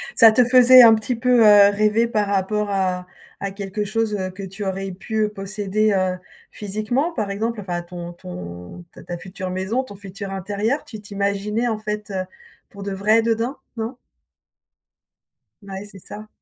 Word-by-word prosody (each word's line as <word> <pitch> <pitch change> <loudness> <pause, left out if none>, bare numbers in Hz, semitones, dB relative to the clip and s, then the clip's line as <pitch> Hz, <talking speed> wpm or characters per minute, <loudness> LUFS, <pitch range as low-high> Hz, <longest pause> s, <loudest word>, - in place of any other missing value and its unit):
Ça 225 -2 +8
te 250 +3 +4
faisait 255 +1 +8
un 225 -1 +9
petit 220 +3 -2
peu, 245 +1 +3
heu, 205 -1 +8
rêver 215 +3 +2
par 210 -3 0
rapport 205 +1 0
à 185 -2 -1 0.3
à 200 - -3
quelque 200 +1 -4
chose, 215 +1 -1
heu, 185 -2 -3
que 190 +2 -9
tu 195 +2 -7
aurais 195 0 -3
pu, 215 +4 -2
heu, - - -3
posséder, 210 +1 -1
heu, 185 -1 0 0.3
physiquement? 215 - -2
Par 210 -9 -2
exemple, 220 +3 -2
enfin, 175 -3 -3
ton 175 0 -8
ton 90 - -9
ta - - -13
ta 175 - -6
future 185 +1 -7
maison, 190 +8 -1
ton 230 -6 -11
futur 195 0 -8
intérieur, 205 - -2
tu 215 -2 -9
t'imaginais, 200 +3 -2
en 220 -2 -1
fait, 210 -1 -5
heu, 190 -1 -2 0.5
pour 200 - -12
de 200 - -4
vrai, 210 +4 +3
dedans, 230 +4 -1 0.2
non? 225 +3 -4 1.6
Bah 200 -1 -10
ouais 195 +2 -6
c'est 200 -2 -12
ça. 210 +4 -10
205 Hz, 180 wpm, -21 LUFS, 190-220 Hz, 1.6 s, un